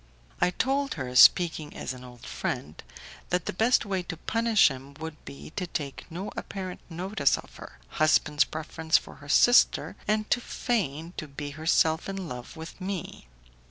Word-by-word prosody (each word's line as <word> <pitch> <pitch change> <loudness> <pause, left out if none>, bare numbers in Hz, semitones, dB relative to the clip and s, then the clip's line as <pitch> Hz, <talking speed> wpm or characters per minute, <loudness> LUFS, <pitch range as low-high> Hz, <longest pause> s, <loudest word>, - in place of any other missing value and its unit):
I - - +4
told 275 +8 0
her, 130 -5 -5
speaking 160 +2 +5
as - - -4
an 125 0 -11
old 125 -1 -12
friend, 75 +2 -4 0.5
that 180 -1 0
the - - -3
best 225 +7 +3
way 195 -2 -1
to 170 -2 -6
punish 225 0 +3
him 135 +1 -10
would 160 0 -8
be 70 +1 -10
to 180 - -4
take 145 -5 -5
no 180 +5 -5
apparent 185 -2 -6
notice 170 -4 +1
of - - -12
her - - -11
husband's 150 - +3
preference 160 +1 0
for - - -9
her 145 -1 -13
sister, 245 - +5
and 215 0 +1
to 245 - +3
feign 170 - -2
to 155 - -5
be 145 +1 -6
herself 160 +2 +1
in 195 -2 -4
love 125 +3 -8
with 160 +4 -9
me. 185 - -5
160 Hz, 170 wpm, -27 LUFS, 145-195 Hz, 0.5 s, speaking